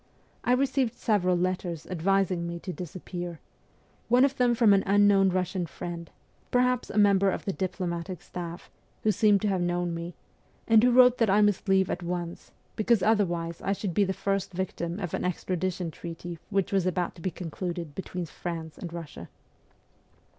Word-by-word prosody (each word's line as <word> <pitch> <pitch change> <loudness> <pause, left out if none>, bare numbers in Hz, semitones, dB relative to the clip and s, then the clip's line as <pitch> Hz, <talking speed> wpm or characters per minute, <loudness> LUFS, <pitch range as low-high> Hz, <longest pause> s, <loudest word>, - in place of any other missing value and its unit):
I 245 - +3
received 260 -2 +1
several 185 -5 +1
letters 180 -2 -2
advising 185 0 0
me 170 0 -4
to 185 - -5
disappear 175 -1 -6 0.7
one 250 +3 +6
of 280 0 -1
them 245 -1 +3
from 225 -3 +5
an 195 - +4
unknown 200 -1 +5
Eussian 180 -1 -1
friend, 170 -1 -6 0.4
perhaps 250 0 +2
a - - -5
member 200 -1 +5
of - - -3
the 195 - -1
diplomatic 180 -2 -3
staff, 175 -1 -7 0.3
who 215 - +4
seemed 210 -1 +3
to - - +2
have 190 -2 0
known 175 0 0
me, 170 0 -6 0.5
and 225 -1 +6
who 250 - +6
wrote 250 0 +6
that 230 -3 +3
I 205 +2 +5
must 205 -1 +2
leave 190 -1 +3
at 175 - -3
once, 175 0 -5 0.3
because 220 -1 +2
otherwise 175 -6 +1
I 195 - 0
should 195 -2 -3
be 205 - +3
the 190 - 0
first 195 0 -2
victim 175 -1 -3
of 180 -5 -4
an - - -2
extradition 180 -1 -2
treaty 170 +1 -7
which 195 -1 0
was 190 -2 +2
about 180 -1 -1
to 170 - -14
be 185 - -1
concluded 170 -1 -5
between 180 0 -5
France 165 -1 -6
and 175 - -5
Eussia. 165 -3 -8
185 Hz, 175 wpm, -28 LUFS, 175-205 Hz, 0.7 s, one